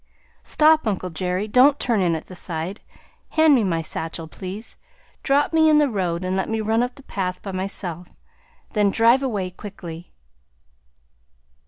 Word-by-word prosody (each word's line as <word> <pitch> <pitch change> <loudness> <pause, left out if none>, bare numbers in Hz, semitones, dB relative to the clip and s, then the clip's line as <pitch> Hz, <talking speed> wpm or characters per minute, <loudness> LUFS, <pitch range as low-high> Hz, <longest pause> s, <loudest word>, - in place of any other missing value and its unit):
"Stop, 310 -3 +3
uncle 185 -3 -2
Jerry! 180 +4 -2
Don't 265 +6 +5
turn 230 -5 +1
in 170 -3 +2
at 160 - -6
the - - -12
side; 175 +2 -5 0.5
hand 315 -1 +5
me 245 -5 +4
my 165 -4 0
satchel, 160 +1 -4
please; 190 +6 -7 0.5
drop 285 +3 +2
me 315 -1 +5
in 305 - +5
the 295 -3 +3
road 180 -4 -1
and 185 +1 -1
let 190 - -1
me 225 0 -1
run 220 +2 +1
up 245 0 -2
the 280 - -15
path 185 -6 -3
by 195 - -5
myself. 185 -2 -4 0.6
Then 210 -2 +2
drive 235 +5 +4
away 205 -9 -2
quickly." 180 -4 -9
200 Hz, 165 wpm, -22 LUFS, 180-245 Hz, 0.6 s, Don't